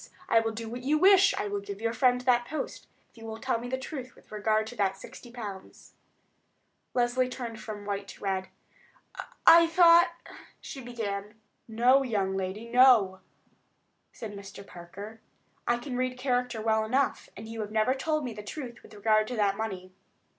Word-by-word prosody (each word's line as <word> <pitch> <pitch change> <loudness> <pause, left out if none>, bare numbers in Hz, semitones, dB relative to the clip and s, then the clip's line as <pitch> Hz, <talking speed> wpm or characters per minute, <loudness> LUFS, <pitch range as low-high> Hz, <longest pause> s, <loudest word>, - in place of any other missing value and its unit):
I 225 - +5
will 225 0 -1
do 225 +1 -6
what 240 +2 -6
you 290 +4 +2
wish—I 385 - +5
will 205 0 -2
give 200 0 -8
your 230 +1 -1
friend 250 +1 +3
that 245 -1 +2
post—if 310 - -8
you 225 - -13
will 220 0 -6
tell 235 0 -1
me 245 +1 -6
the 260 - -1
truth 260 -1 -7
with - - -22
regard 215 +1 +1
to 230 +3 -9
that 195 -1 0
sixty 240 - -12
pounds." 205 -6 -9 1.0
Leslie 250 +1 +1
turned 235 -3 -6
from 215 -2 -7
white 200 -1 -3
to - - -12
red. 190 -1 -1 1.0
"I 335 0 +9
thought——" 340 0 +6 0.4
she 270 - -8
began. 210 -4 -5 0.3
"No, 245 +4 +4
young 200 -7 -1
lady; 195 +4 -4
no," 235 -6 +5 0.9
said 220 -3 -8
Mr. 200 0 -10
Parker. 200 +6 -10 0.5
"I 240 - +3
can 250 +1 -6
read 255 0 -1
character 250 -3 -1
well 220 -1 +2
enough, 260 +6 0
and 220 +2 -8
you 225 0 -5
have 210 - -5
never 220 +4 +2
told 305 +3 -1
me 245 -3 -4
the 210 - -8
truth 240 +2 -8
with - - -15
regard 215 +1 +2
to 250 - -4
that 205 -3 +2
money. 190 -4 -5
225 Hz, 175 wpm, -28 LUFS, 205-255 Hz, 1.0 s, I